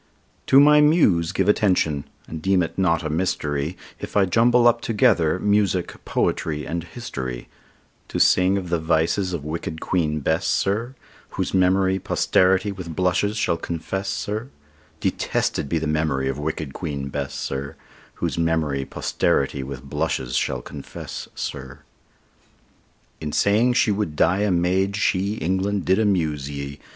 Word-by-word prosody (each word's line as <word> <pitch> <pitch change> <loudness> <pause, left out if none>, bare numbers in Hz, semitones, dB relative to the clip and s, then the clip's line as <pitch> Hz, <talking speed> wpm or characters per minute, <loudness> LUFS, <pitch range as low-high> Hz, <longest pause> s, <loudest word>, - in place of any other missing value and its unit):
To 135 - +7
my 150 +1 +7
Muse 105 - +4
give - - 0
attention, 90 -9 +2 0.2
and 80 -1 -7
deem 95 0 +2
it 80 - -5
not 85 -4 +1
a 80 - -2
mystery 75 -1 -1 0.2
If - - -4
I 100 - +5
jumble 120 +5 +4
up 120 0 +3
together 105 -9 +2
music, 100 -3 0
poetry, 75 -2 -1
and 85 +3 -3
history, 65 - -6 0.6
To - - -3
sing 95 +2 +4
of 90 -3 -4
the 85 - +1
vices 80 +4 +1
of 85 -5 -4
wicked 80 +1 -4
Queen 80 -5 0
Bess, 80 +5 0
sir, 115 +7 0 0.3
Whose - - -3
memory 95 +1 +3
posterity 95 +2 +2
with 90 -4 -7
blushes 95 +5 +1
shall 85 - +1
confess, 90 +4 -4
sir, 110 +5 -3 0.5
Detested 70 - -1
be 85 - +1
the 80 - -2
memory 75 -3 0
of 65 +1 -2
wicked 75 -2 -4
Queen 70 -5 -4
Bess, - - -4
sir, 70 +3 -4 0.4
Whose - - -2
memory 80 -5 0
posterity 70 +1 0
with 65 0 -7
blushes 70 -3 -2
shall 60 - -1
confess, 70 -2 -8
sir. 65 +2 -6 1.4
In 75 - -4
saying 110 +8 +3
she 115 - +3
would 100 -7 -2
die 90 +5 +3
a 105 0 +1
maid, 95 +2 +1
she, 100 0 0
England! 95 +1 -1
did 95 +2 +3
amuse 80 -10 0
ye. 70 0 -6
85 Hz, 150 wpm, -23 LUFS, 75-100 Hz, 1.4 s, To